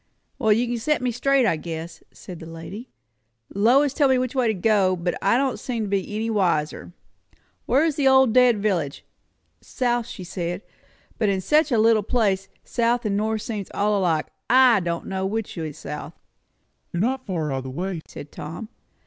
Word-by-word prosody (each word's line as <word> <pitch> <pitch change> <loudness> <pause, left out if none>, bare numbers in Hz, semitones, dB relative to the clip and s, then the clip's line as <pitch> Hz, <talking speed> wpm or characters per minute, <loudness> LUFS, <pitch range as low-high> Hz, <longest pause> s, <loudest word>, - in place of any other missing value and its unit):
"Well, 220 -5 +2
you 230 +4 +3
can 240 -1 -2
set 300 +3 0
me 250 - +1
straight, 265 +2 +2
I 170 -8 +2
guess," 165 0 -7
said 180 -3 -10
the 160 - -9
lady. 180 +9 -9 0.6
"Lois 255 +8 +4
told 285 -3 +3
me 260 - +4
which 255 -1 -1
way 255 -3 +1
to 220 - +2
go, 195 -1 +2
but 175 0 -2
I 200 +4 +3
don't 265 -1 0
seem 235 -4 -3
to - - -3
be 200 +1 -2
any 220 +1 -1
wiser. 180 -8 0 0.8
Where's 295 +3 +2
the 280 -2 +3
old 265 -3 +5
dead 250 -2 +5
village? 180 -9 -1 0.6
South, 240 -2 -1
she 190 - -8
said; 175 +1 -4 0.6
but 215 - +2
in 195 -1 +1
such 300 - +2
a 235 - +3
little 220 0 +4
place 200 -3 0 0.2
south 240 0 0
and 200 -2 0
north 215 +1 -1
seems 210 -5 -5
all 210 +1 +2
alike. 165 -5 +1 0.2
I 250 -3 +6
don' 170 -2 -3
know 190 -1 -3
which 220 +1 -3
is 155 -4 -5
south." 150 -1 -7 0.8
"You - - -4
are - - +1
not 260 +3 -1
far 165 -6 -2
out - - -1
of - - -7
the - - -5
way," 175 +5 -4
said 145 - -10
Tom. 170 +9 -7
215 Hz, 195 wpm, -23 LUFS, 180-245 Hz, 0.8 s, I